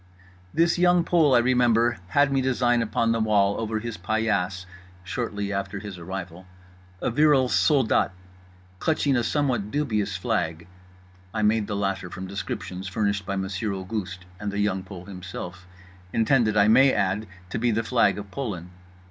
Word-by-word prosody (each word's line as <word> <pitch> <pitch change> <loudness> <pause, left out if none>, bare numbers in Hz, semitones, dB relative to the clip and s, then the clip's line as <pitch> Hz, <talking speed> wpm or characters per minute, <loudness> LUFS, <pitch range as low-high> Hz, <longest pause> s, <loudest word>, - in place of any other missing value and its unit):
This 170 +2 +2
Young 175 -1 +4
Pole, 160 -6 +4
I - - +7
remember, 120 -1 +3
had 145 +8 +3
me 135 - +2
design 125 -2 +2
upon 115 +1 +1
the 115 - +1
wall 100 -2 +2
over 110 -1 -2
his 115 0 -5
paillasse 100 -2 -1 0.4
(shortly 105 -1 -3
after 100 0 -3
his 100 -2 -7
arrival) 90 0 -7 0.6
a - - +1
virile 140 -1 +4
soldat 135 -10 +3 0.7
clutching 150 -4 +1
a 120 - +1
somewhat 125 -7 0
dubious 105 -8 -1
flag—I 90 0 -5
made 105 0 +2
the 100 - -3
latter 95 -2 -2
from 95 +3 -7
descriptions 95 -1 -5
furnished 100 0 -1
by 100 - -1
Monsieur 95 +2 -2
Auguste 95 -1 -5
and 105 -1 -3
The 100 - -4
Young 105 -2 0
Pole 95 -1 -10
himself—intended, 95 +4 -2
I 100 0 +5
may 130 +5 +6
add, 100 0 0 0.2
to - - -2
be 120 +1 +2
the 115 0 +1
flag 120 -1 +2
of 100 -1 -8
Poland. 95 -10 -5
105 Hz, 155 wpm, -25 LUFS, 95-120 Hz, 0.7 s, I